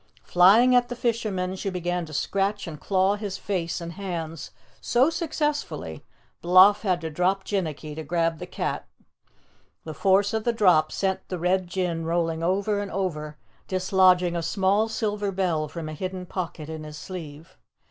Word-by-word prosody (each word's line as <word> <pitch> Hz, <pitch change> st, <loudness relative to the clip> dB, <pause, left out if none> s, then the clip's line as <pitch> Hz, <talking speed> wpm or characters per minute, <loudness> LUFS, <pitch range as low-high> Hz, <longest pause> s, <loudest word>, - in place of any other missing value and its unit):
Flying 205 Hz, +8 st, +6 dB
at 245 Hz, 0 st, +3 dB
the 245 Hz, -, -4 dB
fisherman, 215 Hz, -6 st, -1 dB
she 195 Hz, +1 st, -3 dB
began 175 Hz, -2 st, -2 dB
to -, -, -11 dB
scratch 200 Hz, +6 st, -1 dB
and 155 Hz, -3 st, -8 dB
claw 195 Hz, +1 st, +2 dB
his 205 Hz, -2 st, -4 dB
face 180 Hz, -5 st, -2 dB
and 170 Hz, 0 st, -6 dB
hands 165 Hz, -5 st, -5 dB, 0.3 s
so 260 Hz, +6 st, +3 dB
successfully 300 Hz, -3 st, -3 dB, 0.4 s
Bloff 185 Hz, +4 st, +6 dB
had 185 Hz, -4 st, 0 dB
to 160 Hz, -1 st, -4 dB
drop 185 Hz, +4 st, +1 dB
Jinnicky 155 Hz, -7 st, -3 dB
to 160 Hz, -, -5 dB
grab 165 Hz, +1 st, 0 dB
the -, -, -7 dB
cat. -, -, -3 dB, 1.0 s
The 155 Hz, -, -6 dB
force 195 Hz, +5 st, +2 dB
of 220 Hz, -1 st, -1 dB
the 235 Hz, -, +1 dB
drop 180 Hz, -8 st, +4 dB
sent 190 Hz, -1 st, -2 dB
the 185 Hz, -, -3 dB
Red 180 Hz, +2 st, +1 dB
Jinn 175 Hz, -2 st, -2 dB
rolling 165 Hz, 0 st, -1 dB
over 200 Hz, +4 st, 0 dB
and 205 Hz, -1 st, -4 dB
over, 155 Hz, -6 st, -3 dB, 0.3 s
dislodging 185 Hz, -2 st, +3 dB
a 170 Hz, -, -1 dB
small 195 Hz, +5 st, +1 dB
silver 210 Hz, -2 st, -2 dB
bell 175 Hz, -5 st, 0 dB
from 165 Hz, +1 st, -6 dB
a 155 Hz, -, -5 dB
hidden 185 Hz, +3 st, -5 dB
pocket 170 Hz, -4 st, -5 dB
in 160 Hz, -1 st, -6 dB
his 150 Hz, 0 st, -9 dB
sleeve. 160 Hz, -3 st, -9 dB
185 Hz, 170 wpm, -25 LUFS, 165-200 Hz, 1.0 s, Flying